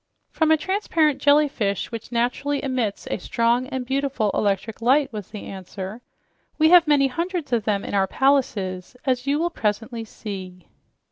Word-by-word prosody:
"From 320 Hz, -1 st, +1 dB
a 315 Hz, -, +6 dB
transparent 320 Hz, -5 st, +1 dB
jellyfish 285 Hz, -10 st, +2 dB
which 230 Hz, 0 st, -7 dB
naturally 250 Hz, +4 st, -1 dB
emits 255 Hz, -7 st, -2 dB
a -, -, -1 dB
strong 235 Hz, +6 st, +1 dB
and 260 Hz, -2 st, -4 dB
beautiful 265 Hz, -5 st, 0 dB
electric 205 Hz, +2 st, -1 dB
light," 270 Hz, +3 st, +3 dB
was 210 Hz, -3 st, -6 dB
the 210 Hz, -, -8 dB
answer. 190 Hz, +3 st, -7 dB, 0.6 s
"We 315 Hz, 0 st, +5 dB
have 350 Hz, -2 st, +7 dB
many 290 Hz, -2 st, +4 dB
hundreds 335 Hz, +1 st, -3 dB
of 225 Hz, -3 st, +1 dB
them 205 Hz, -2 st, 0 dB
in -, -, -6 dB
our 195 Hz, -1 st, +2 dB
palaces, 235 Hz, -8 st, 0 dB
as 255 Hz, -1 st, 0 dB
you 285 Hz, +1 st, +2 dB
will 340 Hz, +2 st, 0 dB
presently 225 Hz, 0 st, -2 dB
see." 190 Hz, -5 st, -8 dB
245 Hz, 160 wpm, -23 LUFS, 210-285 Hz, 0.6 s, have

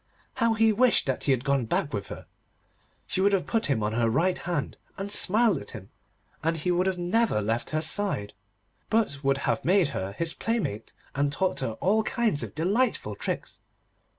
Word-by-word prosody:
How 230 Hz, -2 st, +2 dB
he 220 Hz, 0 st, +4 dB
wished 245 Hz, +2 st, +3 dB
that 130 Hz, -2 st, -2 dB
he 140 Hz, -, +3 dB
had 130 Hz, -2 st, +1 dB
gone 140 Hz, -3 st, +1 dB
back 140 Hz, -, -1 dB
with 100 Hz, -2 st, -3 dB
her! -, -, -9 dB, 0.8 s
She 185 Hz, -, -1 dB
would 200 Hz, +1 st, +3 dB
have 195 Hz, -, +1 dB
put 225 Hz, -2 st, 0 dB
him 125 Hz, -7 st, 0 dB
on 105 Hz, -, 0 dB
her 115 Hz, +1 st, +1 dB
right 170 Hz, +10 st, +2 dB
hand, 170 Hz, -5 st, -3 dB, 0.2 s
and 195 Hz, +1 st, -4 dB
smiled 210 Hz, -3 st, +4 dB
at -, -, -9 dB
him, 100 Hz, -4 st, -10 dB, 0.5 s
and 165 Hz, +1 st, 0 dB
he 180 Hz, +3 st, -1 dB
would 180 Hz, +2 st, +1 dB
have 190 Hz, -1 st, 0 dB
never 180 Hz, -, +1 dB
left 110 Hz, +3 st, -2 dB
her 155 Hz, 0 st, -1 dB
side, 160 Hz, -, -1 dB, 0.6 s
but 210 Hz, -11 st, 0 dB
would 135 Hz, 0 st, +2 dB
have -, -, 0 dB
made 185 Hz, -3 st, +3 dB
her 95 Hz, +1 st, -4 dB
his 165 Hz, +8 st, -2 dB
playmate, 220 Hz, -, -2 dB, 0.2 s
and 140 Hz, +1 st, 0 dB
taught 185 Hz, +6 st, 0 dB
her 125 Hz, -4 st, -2 dB
all 200 Hz, -, +1 dB
kinds 225 Hz, -, 0 dB
of -, -, -6 dB
delightful 200 Hz, +11 st, 0 dB
tricks. -, -, -4 dB
170 Hz, 195 wpm, -27 LUFS, 135-205 Hz, 0.8 s, he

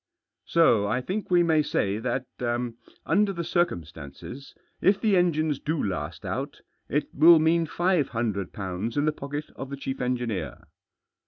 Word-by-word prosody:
"So 115 Hz, -12 st, +4 dB
I 110 Hz, +5 st, +1 dB
think 190 Hz, +11 st, -4 dB
we 175 Hz, -1 st, +5 dB
may 160 Hz, -2 st, +3 dB
say 105 Hz, -8 st, 0 dB
that, 125 Hz, +2 st, -2 dB, 0.8 s
under 200 Hz, +4 st, +3 dB
the 170 Hz, -2 st, -3 dB
circum 170 Hz, -, 0 dB
stances, 80 Hz, -, -10 dB, 0.3 s
if 195 Hz, +1 st, +4 dB
the 215 Hz, -3 st, +2 dB
engines 155 Hz, -5 st, +2 dB
do 155 Hz, 0 st, -1 dB
last 95 Hz, -3 st, -4 dB
out, -, -, -4 dB, 0.3 s
it 150 Hz, +4 st, -1 dB
will 165 Hz, +3 st, +8 dB
mean 165 Hz, +1 st, +2 dB
five 175 Hz, -3 st, +1 dB
hundred 105 Hz, -6 st, -2 dB
pounds 100 Hz, +5 st, -4 dB
in 145 Hz, -, +2 dB
the 155 Hz, -, +3 dB
pocket 145 Hz, +1 st, -6 dB
of 135 Hz, -, -7 dB
the 140 Hz, -, -5 dB
chief 135 Hz, -1 st, -4 dB
engineer." 120 Hz, -5 st, -2 dB
145 Hz, 160 wpm, -26 LUFS, 115-170 Hz, 0.8 s, will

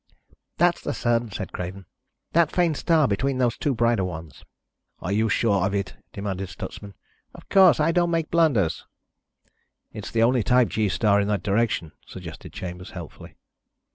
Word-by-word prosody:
"That's 175 Hz, 0 st, +3 dB
the -, -, -3 dB
Sun," 120 Hz, -1 st, 0 dB
said 95 Hz, -2 st, -6 dB
Craven. 90 Hz, +2 st, -6 dB, 0.5 s
"That 170 Hz, -2 st, +3 dB
faint 175 Hz, -3 st, +2 dB
star 155 Hz, -1 st, +3 dB
between 130 Hz, +6 st, 0 dB
those 125 Hz, -3 st, +1 dB
two 140 Hz, -3 st, -1 dB
brighter 115 Hz, -3 st, +2 dB
ones." 80 Hz, -3 st, -7 dB, 0.6 s
"Are 95 Hz, -, -4 dB
you 110 Hz, +2 st, +2 dB
sure 100 Hz, -4 st, +2 dB
of 95 Hz, +1 st, 0 dB
it?" 100 Hz, -3 st, -2 dB, 0.2 s
demanded 95 Hz, -2 st, -4 dB
Stutsman. 100 Hz, +1 st, -8 dB, 0.4 s
"Of -, -, -14 dB
course. 190 Hz, -4 st, +6 dB
I 155 Hz, +2 st, +3 dB
don't 175 Hz, 0 st, +2 dB
make 165 Hz, -2 st, -1 dB
blunders." 130 Hz, -, +2 dB, 1.1 s
"It's -, -, -7 dB
the 115 Hz, -, +2 dB
only 125 Hz, +1 st, +3 dB
type 125 Hz, +2 st, +3 dB
G 110 Hz, -2 st, 0 dB
star 100 Hz, +3 st, +3 dB
in 100 Hz, -, -1 dB
that 105 Hz, -3 st, -1 dB
direction," 105 Hz, -6 st, 0 dB, 0.2 s
suggested -, -, -9 dB
Chambers, 90 Hz, 0 st, -7 dB
helpfully. -, -, -10 dB
110 Hz, 165 wpm, -24 LUFS, 95-140 Hz, 1.1 s, course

